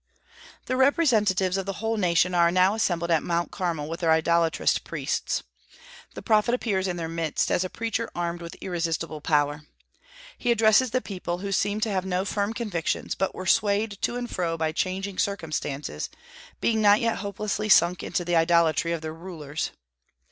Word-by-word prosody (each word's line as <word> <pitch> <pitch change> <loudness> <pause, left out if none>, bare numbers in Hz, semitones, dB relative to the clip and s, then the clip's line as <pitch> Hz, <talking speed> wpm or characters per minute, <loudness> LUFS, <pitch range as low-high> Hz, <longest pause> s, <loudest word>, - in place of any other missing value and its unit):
The 255 - -1
representatives 215 - +3
of 195 0 -3
the 195 - -2
whole 225 +1 -1
nation 180 -2 +2
are 170 -1 +4
now 185 +3 +3
assembled 175 -6 0
at 160 -2 +3
Mount 170 0 -1
Carmel, 165 -5 -2
with 165 +2 -5
their 165 -2 +2
idolatrous 165 +1 +2
priests. - - -2 0.7
The - - -7
prophet 220 +1 +3
appears 195 -6 -1
in 180 -1 -2
their 165 -1 -3
midst 165 -2 -1
as 180 - +2
a 185 - -4
preacher 230 +1 -3
armed 175 0 -3
with 170 0 -8
irresistible 165 -3 -3
power. 145 -1 +1 0.8
He 245 - -1
addresses 225 +2 +4
the 255 +3 0
people, 180 -5 -4
who 195 +2 -5
seemed 205 +2 0
to 220 - 0
have 190 -2 0
no 190 0 -1
firm 205 +1 -1
convictions, 200 -9 -2
but 195 - -2
were 185 - -6
swayed 205 0 +2
to - - 0
and 245 0 -3
fro 170 -6 -2
by 160 -1 0
changing 190 +3 -3
circumstances, 155 -7 -3 0.5
being 220 -1 +2
not 205 0 +6
yet 230 -1 0
hopelessly 210 +1 -3
sunk 175 -2 +5
into 175 - -2
the 175 0 0
idolatry 170 0 +3
of 165 - -3
their 155 0 -4
rulers. 160 -3 -5
185 Hz, 175 wpm, -26 LUFS, 170-210 Hz, 0.8 s, not